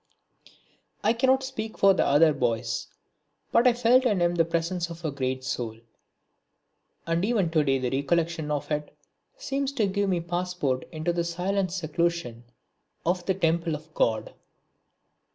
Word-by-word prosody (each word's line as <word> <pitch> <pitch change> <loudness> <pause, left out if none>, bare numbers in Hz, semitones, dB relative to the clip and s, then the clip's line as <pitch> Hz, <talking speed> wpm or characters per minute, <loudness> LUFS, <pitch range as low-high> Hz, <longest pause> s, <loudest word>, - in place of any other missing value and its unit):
I 220 - +4
cannot 260 +3 +3
speak 225 -5 -5
for 195 0 +6
the - - +2
other 150 +2 +5
boys 115 -3 -1 0.6
but 235 +2 +5
I 245 - +6
felt 245 +2 +4
in 210 -7 +2
him 175 0 +2
the 170 -1 +3
presence 170 +1 -1
of 170 0 -9
a 155 - 0
great 130 -1 -2
soul, 120 -4 -3 1.3
and 165 +1 0
even 200 -6 +1
to 155 -2 +3
day 135 -2 +2
the 125 -1 -2
recollection 160 +3 0
of 150 +1 -3
it 150 0 -3 0.4
seems 275 - -2
to 230 -7 +1
give 200 0 0
me 180 - +2
a - - -2
passport 175 -6 -2
into 160 +1 -2
the 170 0 0
silent 180 +2 -1
seclusion 170 -8 -2 0.6
of 175 +1 0
the 190 - +2
temple 165 -2 +1
of 155 +1 -12
God. 110 -6 0
170 Hz, 160 wpm, -26 LUFS, 150-195 Hz, 1.3 s, for